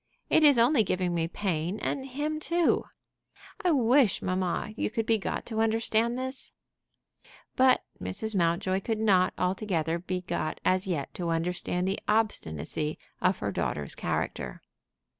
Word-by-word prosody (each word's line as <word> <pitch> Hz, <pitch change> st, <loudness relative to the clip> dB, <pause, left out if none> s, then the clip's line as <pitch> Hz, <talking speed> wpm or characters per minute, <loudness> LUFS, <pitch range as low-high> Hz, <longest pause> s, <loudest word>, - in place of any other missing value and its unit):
It 315 Hz, -, +5 dB
is 290 Hz, -4 st, +7 dB
only 235 Hz, +1 st, +5 dB
giving 180 Hz, -2 st, -1 dB
me 165 Hz, -1 st, 0 dB
pain 175 Hz, 0 st, -2 dB
and 265 Hz, +4 st, -3 dB
him 295 Hz, +4 st, -2 dB
too. 335 Hz, +1 st, +2 dB, 0.8 s
I 360 Hz, -, +3 dB
wish, 255 Hz, -, +4 dB
mamma, 185 Hz, +2 st, -1 dB
you -, -, -1 dB
could 225 Hz, 0 st, -2 dB
be 225 Hz, -1 st, +2 dB
got -, -, -3 dB
to 220 Hz, -1 st, -2 dB
understand 225 Hz, +1 st, +1 dB
this." 260 Hz, +1 st, -4 dB, 1.0 s
But 260 Hz, 0 st, +4 dB, 0.2 s
Mrs. 200 Hz, -, -3 dB
Mountjoy 180 Hz, +2 st, +1 dB
could 220 Hz, +2 st, -1 dB
not 195 Hz, -4 st, +3 dB
altogether 180 Hz, -3 st, 0 dB
be 180 Hz, +1 st, -3 dB
got 160 Hz, -3 st, -3 dB
as 185 Hz, +1 st, +2 dB
yet 155 Hz, -7 st, -2 dB
to 175 Hz, -2 st, -3 dB
understand 175 Hz, +2 st, -1 dB
the 195 Hz, -, -1 dB
obstinacy 155 Hz, -, 0 dB, 0.2 s
of 185 Hz, 0 st, +2 dB
her 100 Hz, -, -2 dB
daughter's 80 Hz, -9 st, -2 dB
character. -, -, -3 dB
195 Hz, 145 wpm, -28 LUFS, 175-230 Hz, 1.0 s, is